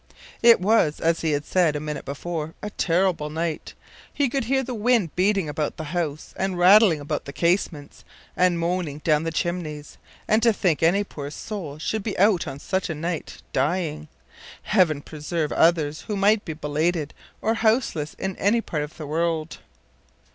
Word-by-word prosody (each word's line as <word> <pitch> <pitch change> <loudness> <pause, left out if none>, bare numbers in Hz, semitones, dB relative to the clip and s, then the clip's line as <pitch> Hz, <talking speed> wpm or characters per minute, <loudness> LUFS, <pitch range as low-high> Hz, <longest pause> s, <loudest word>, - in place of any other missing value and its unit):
It 235 0 +7
was, 185 -6 +2
as 165 0 +1
he 160 -2 0
had 145 +1 -1
said 175 -5 +2
a - - -1
minute 150 0 -5
before, 160 +2 -5
a 210 - -4
terrible 175 -4 +1
night. 160 +1 -4 0.4
He 285 -3 0
could 270 -1 -1
hear 265 +2 +1
the 255 - -5
wind 225 -6 +1
beating 195 -1 +2
about 150 0 -3
the 160 - -5
house 160 -4 -3
and 190 -1 -1
rattling 185 -2 +6
about 145 - -4
the 140 - -6
casements 170 -3 -1 0.3
and 180 -1 +3
moaning 170 -3 -2
down 155 0 +2
the 165 - -1
chimneys; 160 -3 -4 0.3
and 215 +1 +3
to 230 0 +5
think 180 -7 0
any 175 +5 +3
poor 145 -7 -7
soul 160 -3 -6
should 215 +7 -2
be 205 0 -4
out 195 -2 +3
on 135 - -5
such 190 +6 -2
a 160 - -2
night, 165 +1 -5
dying! 155 +2 -1 0.6
Heaven 165 -8 +2
preserve 155 0 -3
others 160 -3 +2
who 210 - -2
might 205 +2 +3
be 160 - -4
belated 155 +1 -1 0.3
or 220 - +1
houseless 220 - 0
in 190 -1 -4
any 210 +4 +2
part 155 -9 -3
of 150 +2 -7
the 155 - -6
world! 160 +1 -2
170 Hz, 175 wpm, -24 LUFS, 150-195 Hz, 0.6 s, It